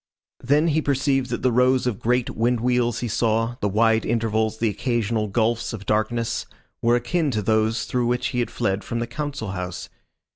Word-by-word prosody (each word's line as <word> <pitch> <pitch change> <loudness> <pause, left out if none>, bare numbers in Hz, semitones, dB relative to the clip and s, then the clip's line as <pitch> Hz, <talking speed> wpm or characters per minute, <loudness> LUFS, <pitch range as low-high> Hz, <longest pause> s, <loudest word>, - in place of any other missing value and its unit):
Then 145 +6 +3
he 155 +1 +2
perceived 135 -2 +1
that 120 - -3
the 130 - +3
rows 125 +2 +3
of 120 -6 -1
great 125 +1 +1
wind 120 +1 +1
wheels 120 -1 +1
he 120 - -2
saw, 115 +2 0
the 105 - +1
wide 110 +2 +3
intervals, 110 -1 0
the 115 - +1
occasional 110 -1 -1
gulfs 115 +3 0
of 100 -3 -7
darkness, 110 +2 -1 0.3
were 120 +1 +3
akin 145 +6 0
to 110 -5 -1
those 110 +2 +1
through 125 -1 0
which 125 0 0
he 125 - -2
had 120 - 0
fled 100 -4 -1
from 115 - -4
the 120 - -1
Council 135 -3 -5
House. 90 -1 -5
120 Hz, 190 wpm, -23 LUFS, 110-125 Hz, 0.3 s, Then